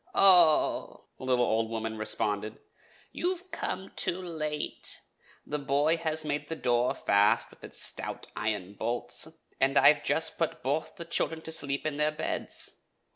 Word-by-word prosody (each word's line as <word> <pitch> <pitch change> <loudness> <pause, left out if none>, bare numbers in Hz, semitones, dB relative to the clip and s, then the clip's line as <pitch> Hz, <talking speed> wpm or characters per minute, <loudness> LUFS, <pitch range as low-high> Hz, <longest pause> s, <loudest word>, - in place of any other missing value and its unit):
"Oho!" 175 -5 +5
the - - -7
little 125 -1 +2
old 110 0 0
woman 110 -1 -3
responded, 110 0 -2 0.5
"you 360 0 -1
come 190 - -4
too 175 - +1
late. 155 -4 -3 0.5
The 150 - -3
boy 145 +4 +2
has 160 -1 -1
made 145 0 -2
the 160 - -3
door 120 -4 +1
fast 100 +1 +2
with - - -20
its - - -4
stout - - -1
iron 105 -3 -2
bolts, 120 +5 -2 0.3
and 135 +1 +2
I - - +8
have 145 - -12
just 160 - +1
put 165 - -2
both 145 +5 -2
the 170 -4 -8
children 165 -1 -1
to 160 - -6
sleep 140 -3 -1
in 150 -2 -2
their 150 0 +3
beds. 150 - -3
145 Hz, 160 wpm, -29 LUFS, 120-160 Hz, 0.5 s, I